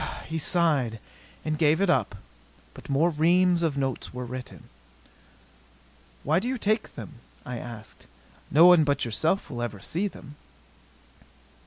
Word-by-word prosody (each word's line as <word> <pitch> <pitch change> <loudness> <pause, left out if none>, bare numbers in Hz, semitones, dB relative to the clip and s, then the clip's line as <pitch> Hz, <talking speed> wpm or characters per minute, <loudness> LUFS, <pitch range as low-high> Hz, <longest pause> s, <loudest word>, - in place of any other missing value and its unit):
He 160 +1 -3
sighed 150 -9 +1 0.5
and 155 -1 -2
gave 155 0 +3
it 200 - +2
up. 175 - +1 0.6
But - - -13
more 155 +5 +2
reams 175 +3 +3
of 160 -4 0
notes 135 -2 -3
were 125 0 -6
written. 125 +1 -8 1.6
"Why 155 +4 +2
do 225 - -4
you 260 +1 -1
take 215 0 -1
them?" - - -9 0.3
I 125 -1 -5
asked. 115 -3 -11 0.4
"No 160 +4 +6
one 175 -3 +7
but 140 -2 0
yourself 155 - -1
will 120 -2 -5
ever 115 -4 -4
see 175 - -2
them." 150 -6 -12
155 Hz, 145 wpm, -26 LUFS, 125-175 Hz, 1.6 s, one